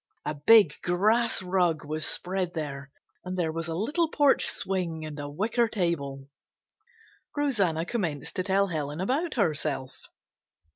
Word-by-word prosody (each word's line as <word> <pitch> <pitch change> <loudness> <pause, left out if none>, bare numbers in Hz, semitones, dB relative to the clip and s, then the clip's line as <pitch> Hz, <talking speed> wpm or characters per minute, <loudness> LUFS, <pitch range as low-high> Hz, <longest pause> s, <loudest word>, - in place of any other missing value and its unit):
A 150 - -1
big 165 +3 +6
grass 215 +5 +2
rug 180 -4 +1
was 155 +1 -1
spread 180 -1 -1
there, 140 -3 -5 0.3
and 185 0 -5
there 165 -3 0
was 165 0 -4
a 165 - -3
little 300 - 0
porch 290 -3 +3
swing 170 -5 -2
and 150 -1 -7
a 145 0 -5
wicker 225 +10 0
table. 145 -10 -2 1.1
Rosanna 200 - +1
commenced 175 - -3
to 185 - 0
tell 195 +1 +2
Helen 150 -2 -3
about 280 - -1
herself. 150 - -1
175 Hz, 140 wpm, -27 LUFS, 155-210 Hz, 1.1 s, big